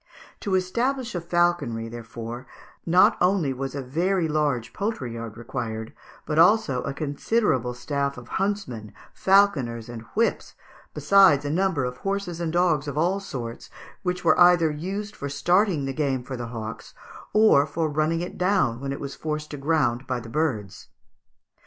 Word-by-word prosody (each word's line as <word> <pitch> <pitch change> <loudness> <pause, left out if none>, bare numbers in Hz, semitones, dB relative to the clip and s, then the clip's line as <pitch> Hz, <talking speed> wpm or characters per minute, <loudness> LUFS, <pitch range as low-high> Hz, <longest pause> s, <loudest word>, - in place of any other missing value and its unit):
To 200 -3 -1
establish 240 +7 -1
a 175 - -3
falconry, 170 -10 0
therefore, 115 +1 -8 0.4
not 180 +2 +5
only 180 -6 +2
was 135 +1 -5
a 140 - -3
very 170 +6 0
large 150 -6 -1
poultry 200 - -3
yard 115 -1 -7
required, 115 -2 -5 0.3
but 155 0 0
also 170 - +4
a 140 - -3
considerable 140 - 0
staff 140 +2 -2
of 125 -1 -10
huntsmen, 180 - -3 0.2
falconers, 140 - +2
and 120 -2 -7
whips, 230 +2 0 0.4
besides 190 -8 +5
a 145 - -1
number 170 -5 +1
of 125 0 -5
horses 195 -1 -3
and 165 -2 -1
dogs 170 -4 +2
of 145 0 -4
all 180 +5 +2
sorts, 125 -11 -7 0.3
which 180 -1 -3
were 160 - +4
either 175 -3 +6
used 195 +7 -5
for 140 - -5
starting 175 +2 +2
the 135 - -3
game 135 -3 -1
for 130 +1 -6
the 120 -1 -5
hawks, 110 -1 -7 0.4
or 210 -10 +5
for 160 +2 -1
running 155 +2 0
it 175 - -6
down 180 - +2
when 135 +1 -4
it 140 - -4
was 140 -1 -5
forced 150 -1 -4
to 145 - -5
ground 135 -4 0
by 125 -1 -1
the 115 -1 -10
birds. 120 - -2
150 Hz, 165 wpm, -25 LUFS, 125-180 Hz, 0.4 s, either